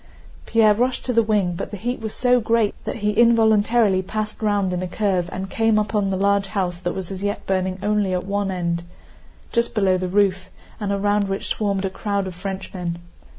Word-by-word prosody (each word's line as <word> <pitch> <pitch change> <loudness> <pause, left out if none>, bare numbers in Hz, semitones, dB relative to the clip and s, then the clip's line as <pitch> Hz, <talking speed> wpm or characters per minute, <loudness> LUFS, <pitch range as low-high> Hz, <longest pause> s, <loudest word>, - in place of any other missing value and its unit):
Pierre 220 -2 +5
rushed 250 +4 -1
to 250 - -1
the 230 - +5
wing, 210 -5 +1
but 170 - -5
the 205 - -6
heat 245 +6 -3
was 220 -1 -4
so 250 0 +3
great 225 -2 +1
that - - -3
he 210 - +3
involuntarily 220 -2 +4
passed 215 +3 -4
round 205 -3 +1
in 180 - -2
a 185 - -2
curve 185 -2 0
and 190 +1 -4
came 225 +2 +2
upon 210 -1 0
the 190 - -1
large 200 0 +2
house 185 -4 -2
that 175 -1 -3
was 190 -1 -4
as 190 -1 -6
yet 205 +1 -2
burning 185 -1 0
only 210 -2 +1
at 180 0 -1
one 200 0 -1
end, 170 -2 -1 0.7
just 235 0 0
below 190 -3 +3
the 185 - -2
roof, 190 0 +1 0.3
and 205 -2 -2
around 205 +1 +1
which 195 0 -3
swarmed 200 -2 -1
a - - 0
crowd 200 0 -2
of 185 - -5
Frenchmen. 185 -2 -5
200 Hz, 205 wpm, -22 LUFS, 185-215 Hz, 0.7 s, Pierre